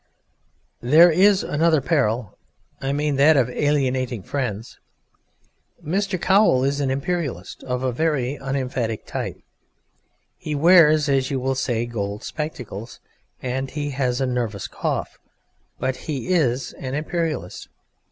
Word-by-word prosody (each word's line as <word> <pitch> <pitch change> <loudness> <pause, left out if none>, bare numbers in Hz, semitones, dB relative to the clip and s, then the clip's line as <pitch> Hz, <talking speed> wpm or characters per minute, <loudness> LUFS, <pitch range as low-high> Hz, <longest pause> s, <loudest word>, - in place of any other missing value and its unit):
There 160 +8 +6
is 195 +4 +4
another 160 +1 +2
peril 125 - 0 0.5
I 135 - -1
mean 145 0 0
that 145 +2 +6
of 125 -2 +2
alienating 130 -6 0
friends. 115 -4 -4 1.1
Mr. 190 +3 -1
Cowl 190 -10 +4
is 140 +1 0
an 140 -2 0
Imperialist 135 - -3
of 125 0 -2
a 130 - +1
very 140 -1 0
unemphatic 130 -5 -3
type: - - -4 1.0
he 150 - -4
wears 155 -1 +6
(as 135 -2 +1
you 135 - -1
will 135 +1 0
say) 120 -3 -1
gold 105 -3 -4
spectacles, 125 -8 -6 0.4
and 130 +1 -2
has 135 -3 -2
a 135 - +1
nervous 120 -5 -2
cough, - - -3 0.6
but 130 - -1
he 150 +2 -5
is 135 -8 +1
an 130 0 -4
Imperialist. 155 - -3
135 Hz, 125 wpm, -22 LUFS, 125-155 Hz, 1.1 s, There